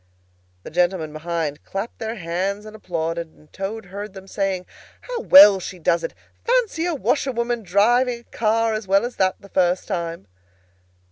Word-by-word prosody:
The -, -, -9 dB
gentlemen 175 Hz, -2 st, 0 dB
behind 155 Hz, -2 st, -3 dB
clapped 195 Hz, +4 st, -5 dB
their 225 Hz, 0 st, -3 dB
hands 195 Hz, +3 st, -3 dB
and 215 Hz, 0 st, -10 dB
applauded, 170 Hz, -4 st, -3 dB
and 155 Hz, -1 st, -24 dB
Toad 200 Hz, +3 st, -5 dB
heard 200 Hz, +2 st, -8 dB
them 190 Hz, 0 st, -10 dB
saying, 190 Hz, -2 st, -2 dB, 0.4 s
"How -, -, -5 dB
well 210 Hz, -, +8 dB
she 185 Hz, 0 st, -7 dB
does 170 Hz, 0 st, +1 dB
it! -, -, -4 dB, 0.3 s
Fancy 460 Hz, -9 st, +1 dB
a 345 Hz, -, -1 dB
washerwoman 240 Hz, -4 st, 0 dB
driving 235 Hz, +5 st, +2 dB
a -, -, -26 dB
car 225 Hz, 0 st, 0 dB
as 215 Hz, -2 st, -4 dB
well 195 Hz, +4 st, +3 dB
as 245 Hz, -, -6 dB
that, 185 Hz, -1 st, +2 dB
the 200 Hz, -, -15 dB
first 180 Hz, -1 st, +1 dB
time!" 170 Hz, -, -4 dB
195 Hz, 165 wpm, -22 LUFS, 175-230 Hz, 0.4 s, well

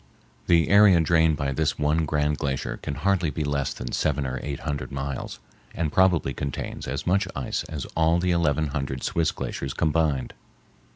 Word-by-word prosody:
The 85 Hz, -2 st, +4 dB
area 100 Hz, -3 st, +7 dB
drained 80 Hz, -1 st, +3 dB
by 70 Hz, -2 st, -1 dB
this 75 Hz, +2 st, 0 dB
one 75 Hz, +2 st, +1 dB
grand 75 Hz, 0 st, 0 dB
glacier 70 Hz, -3 st, -2 dB
can 70 Hz, -, -5 dB
hardly 90 Hz, +2 st, +1 dB
be 75 Hz, -, -3 dB
less 70 Hz, -2 st, -1 dB
than 60 Hz, -, -6 dB
seven 70 Hz, -2 st, 0 dB
or 65 Hz, -1 st, -3 dB
eight 70 Hz, -2 st, -5 dB
hundred 70 Hz, -4 st, -4 dB
miles, 70 Hz, 0 st, -4 dB, 0.4 s
and 80 Hz, -3 st, -1 dB
probably 90 Hz, -7 st, +3 dB
contains 70 Hz, +1 st, -5 dB
as 65 Hz, +2 st, -3 dB
much 95 Hz, +3 st, +2 dB
ice -, -, -2 dB
as 75 Hz, -5 st, -5 dB
all 80 Hz, +1 st, +3 dB
the 90 Hz, +1 st, +1 dB
eleven 80 Hz, -3 st, +1 dB
hundred 70 Hz, -2 st, -3 dB
Swiss 85 Hz, -1 st, +1 dB
glaciers 70 Hz, 0 st, -5 dB
combined. 80 Hz, -4 st, 0 dB
75 Hz, 175 wpm, -25 LUFS, 70-85 Hz, 0.4 s, area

